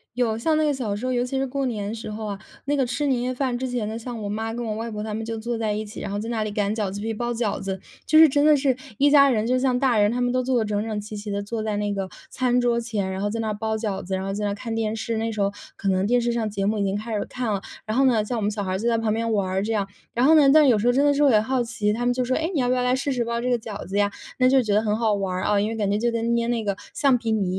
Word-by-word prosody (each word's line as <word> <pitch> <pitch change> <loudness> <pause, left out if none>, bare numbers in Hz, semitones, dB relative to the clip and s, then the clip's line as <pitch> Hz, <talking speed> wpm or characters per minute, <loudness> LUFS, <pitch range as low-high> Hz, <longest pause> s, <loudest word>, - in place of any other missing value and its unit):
有， 230 -3 +1
像 310 +6 +1
那 310 - +2
个 295 - +2
小 235 -6 -2
时 250 - -5
候， 255 - 0
尤 245 0 +1
其 265 +2 -3
是 270 0 0
过 275 +1 -2
年 215 -2 -3
时 220 -1 -7
候 215 +1 -5
啊， 200 -1 -4 0.3
那 290 +1 +1
个 270 -2 +2
吃 280 +4 -1
年 250 -3 +1
夜 255 +1 -1
饭 255 -2 -1
之 260 0 -3
前 240 -4 -2
呢， 220 +1 -4
像 230 -1 -6
我 205 - -4
妈 220 +2 -3
跟 240 0 -4
我 215 -1 -2
外 225 +1 -4
婆 210 0 -4
她 215 0 -4
们 225 +1 -3
就 225 0 -4
坐 235 +1 -3
在 220 -2 -1
一 215 +1 -2
起， 210 - -9
然 - - -4
后 205 - -2
在 225 - -5
那 225 -2 -1
里 215 - -3
擀 205 +1 0
饺 205 -4 -1
子 200 - -6
皮、 225 +1 -2
包 240 +2 -2
饺 225 -3 -1
子， 190 -1 -3 0.3
就 310 - +5
是 320 - +10
真 285 +1 +2
的 305 -1 +6
是 265 -2 +2 0.2
一 285 +1 +4
家 280 -1 +7
人 225 -2 +1
就 255 +1 +2
像 255 -1 +1
大 255 -5 +2
人， 205 +1 +4
他 245 - -2
们 245 0 +1
都 255 0 +1
坐 255 -1 +1
得 220 - 0
整 210 0 -1
整 215 -2 -3
齐 210 +1 -7
齐 205 0 -6
地 200 0 -1
坐 215 +2 -4
在 210 -1 -1
那 205 -1 -1
个 195 -1 -3 0.2
餐 250 -1 +1
桌 240 -1 +1
前， 210 -5 -2
然 190 +1 -4
后 205 - 0
在 230 +2 -3
那 215 -1 -1
包 220 +1 -2
饺 210 -3 -3
子， 190 +1 -5
然 190 0 -2
后 195 - -2
在 210 +1 -3
那 200 - 0
看 225 +2 -5
电 220 -1 -1
视， 225 +1 -3
那 225 +1 -1
时 215 - -6
候 200 0 +1 0.2
可 200 - -4
能 190 0 +2
电 245 +3 +3
视 235 0 0
上 225 -2 -1
节 195 -1 -2
目 210 0 0
已 - - +1
经 195 +1 0
开 220 +1 -5
始 205 - 0
看 245 -4 -3
了， 195 - -2 0.2
然 220 +3 -2
后 270 - +5
呢， 225 -5 +3
像 240 +2 -2
我 - - -2
们 205 +1 0
小 205 -1 -3
孩 185 -1 -2
儿 - - 0
就 235 +4 0
在 230 - +2
旁 220 -1 0
边 230 0 -1
玩 200 -3 +1
儿 190 +1 0
这 225 - -2
样。 200 -3 0 0.3
然 245 +2 +2
后， 320 +2 +7 0.2
但 305 -1 +6
有 235 -4 +5
时 210 - -2
候 245 - +5
真 275 +3 +3
的 290 - +4
是 290 +1 +2
我 275 - +6
也 215 - +5
好 250 +2 0
奇， 220 -3 -1
他 240 +2 -2
们 245 - +3
就 250 0 -1
说： 255 - 0
“诶， 325 +4 -1
你 295 - 0
要 250 - +1
不 250 - +2
要 250 0 +1
来 250 0 +2
试 275 +1 -1
试 245 -2 0
包 235 0 -2
这 250 +1 -1
个 245 - +3
饺 215 -2 -7
子 195 +2 -3
呀？” 205 0 +2 0.3
那 255 -1 +4
就 270 - +4
是 255 - +4
觉 205 - +1
得 210 - +4
很 215 -1 0
好 220 -2 +2
玩 195 -2 -1
儿， 185 - -2
啊， 210 - +2
因 215 - 0
为 225 - -4
感 205 -2 0
觉 205 - +1
就 235 +2 +1
跟 230 0 0
捏 235 0 0
那 235 -2 0
个 200 -2 -1 0.2
橡 270 -3 +3
皮 230 -1 -3
泥 190 -4 0
225 Hz, 390 characters per minute, -24 LUFS, 210-245 Hz, 0.3 s, 是